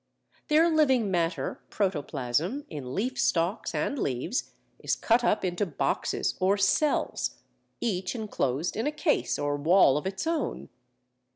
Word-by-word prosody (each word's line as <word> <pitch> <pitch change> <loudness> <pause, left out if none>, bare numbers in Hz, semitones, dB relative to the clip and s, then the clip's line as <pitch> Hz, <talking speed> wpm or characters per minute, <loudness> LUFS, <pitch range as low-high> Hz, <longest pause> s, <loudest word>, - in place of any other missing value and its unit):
Their 315 +2 +5
living 265 - +3
matter 170 -1 -1
(protoplasm) 165 - -1
in 130 -4 -6
leaf 255 +6 -2
stalks 175 +5 0
and 280 - -1
leaves 130 - -2 0.3
is - - 0
cut 235 +1 +2
up 210 -4 +2
into 175 +2 -1
boxes 150 - -1
or 190 +2 +3
cells, 205 +9 +1 0.4
each 190 -3 -2
enclosed 170 - -2
in 225 +6 -1
a - - +1
case 300 +1 0
or 145 0 -1
wall 155 -2 +5
of 150 - -3
its 190 +6 -4
own. 325 -3 -2
195 Hz, 135 wpm, -28 LUFS, 160-250 Hz, 0.4 s, Their